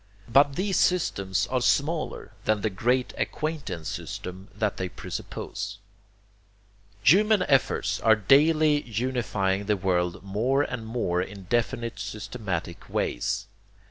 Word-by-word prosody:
But 140 +3 +4
these 190 +2 +1
systems 100 - +1
are 130 -1 +1
smaller 155 +5 0
than 110 -1 +2
the 110 - 0
great 125 +6 +1
acquaintance 135 - -3
system 95 +2 -6
that 105 -1 -1
they 95 -1 -2
presuppose. 100 +3 -6 1.3
Human 210 - +5
efforts 115 -6 +2
are 110 -1 +5
daily 150 +7 +4
unifying 110 -5 -1
the 105 -1 +2
world 90 -1 0
more 115 +8 +1
and 120 -5 -5
more 100 -7 0
in 95 +1 -7
definite 115 +1 -1
systematic 105 -5 -5
ways. - - -1
110 Hz, 115 wpm, -26 LUFS, 95-135 Hz, 1.3 s, Human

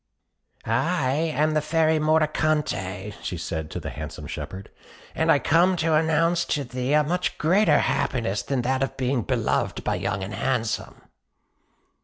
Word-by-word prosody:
"I 130 +4 +1
am 155 +1 +1
the 155 - +2
Fairy 160 0 +2
Mordicante," 155 -11 0
said - - -17
she 90 - -3
to 80 -1 -4
the - - -6
handsome - - -7
shepherd; 95 +1 -7 0.4
"and - - +2
I - - +6
come 175 +4 +3
to 165 -1 +1
announce 165 +2 +2
to 145 - -1
thee 125 +2 -2
a 150 0 +5
much 180 +4 -1
greater 190 +7 +4
happiness 115 -6 0
than 135 -3 -2
that 130 +2 0
of 135 - -2
being 130 -1 0
beloved - - -1
by - - 0
Young 100 -1 -2
and 100 +3 -6
Handsome." 115 -4 -2
145 Hz, 155 wpm, -24 LUFS, 115-160 Hz, 0.4 s, I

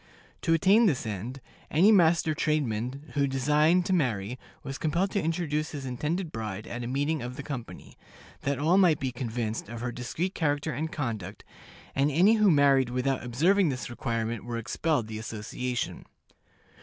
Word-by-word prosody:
To 165 -2 +3
attain 200 +7 +5
this 145 -11 0
end, 110 +6 -5 0.3
any 180 +9 +5
master 170 -5 +4
tradesman 140 -2 -1
who 140 -1 +2
designed 150 +6 +3
to 190 - 0
marry 125 - 0 0.2
was 135 0 -6
compelled 175 +5 0
to 200 - 0
introduce 160 -2 -1
his 140 -2 -5
intended 155 +7 -2
bride 110 -2 -5
at 120 0 -5
a - - -4
meeting 145 +4 0
of 125 +1 -5
the 140 - -6
company, 120 - -8 0.4
that 140 0 -1
all 165 +7 +3
might 170 -6 +4
be 130 -1 -2
convinced 115 -3 -3
of 115 0 -6
her 125 0 -2
discreet 155 +10 -3
character 145 -1 0
and 155 +5 -3
conduct, 110 - -4 0.5
and 140 +2 +2
any 180 +9 +5
who 210 -2 +5
married 140 -5 +4
without 125 0 -1
observing 165 +10 +3
this 125 -3 -4
requirement 115 -2 -2
were 120 0 -4
expelled 120 +3 0
the 110 0 -6
association. 120 +3 -4
140 Hz, 170 wpm, -28 LUFS, 120-160 Hz, 0.5 s, attain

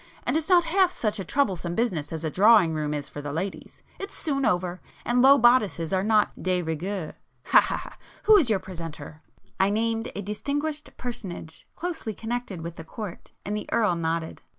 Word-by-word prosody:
And - - -1
it's 320 +3 -1
not 355 -2 +6
half 370 +2 +3
such 215 - -2
a - - -2
troublesome 185 - -1
business 185 -11 -1
as 160 -1 -5
a 160 - -1
Drawing 200 -3 +5
room 150 -1 -2
is 145 -1 -3
for 145 - -8
the 145 0 -5
ladies. 185 +6 -5 0.2
It's 395 - -6
soon 275 -4 0
over,—and 180 +7 -1
low 275 +2 +8
bodices 220 - +3
are 190 0 +2
not 215 0 +2
de 185 -1 0
rigeur—ha—ha—ha! 170 +2 -1 0.3
Who 435 - +7
is 320 - +4
your 215 - +3
presenter?" 165 -4 -8 0.4
I 190 - +4
named 225 +2 -1
a 205 - -4
distinguished 290 +9 -3
personage, 200 -10 -7
closely 325 - -4
connected 225 -5 -4
with 170 0 -7
the 165 - -7
Court, 195 +2 -8
and 205 - -2
the 210 - -5
Earl 215 -6 +2
nodded. 165 0 -2
205 Hz, 175 wpm, -26 LUFS, 170-245 Hz, 0.4 s, low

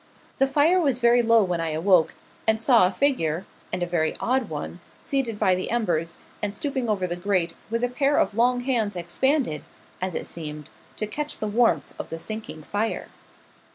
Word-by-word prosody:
The 270 - +4
fire 300 +7 +4
was 275 -6 +2
very 240 0 +4
low 230 -1 +5
when 180 -3 -1
I 165 - -1
awoke, 170 +1 +3 0.3
and 220 0 +3
saw 230 -5 +5
a - - -2
figure 190 - 0 0.3
and 180 0 -1
a - - +1
very 170 -2 0
odd 255 -1 0
one 155 +3 -5 0.2
seated 260 -6 -1
by 185 - +3
the 185 +1 -2
embers, 170 -8 0 0.2
and 205 -1 -2
stooping 270 -6 -2
over 195 -3 +1
the 175 -1 -2
grate, 175 -2 0 0.2
with 230 +2 -1
a - - +3
pair 275 +3 +1
of - - +2
long 245 +3 +2
hands 235 -6 0
expanded, 180 - 0 0.4
as 185 -1 -2
it - - -3
seemed, 150 -3 -7 0.2
to 215 - -2
catch 295 +8 -4
the - - -3
warmth 210 - +2
of - - -5
the 165 - -4
sinking 215 -3 -7
fire. 210 +7 -2
215 Hz, 190 wpm, -25 LUFS, 175-245 Hz, 0.4 s, low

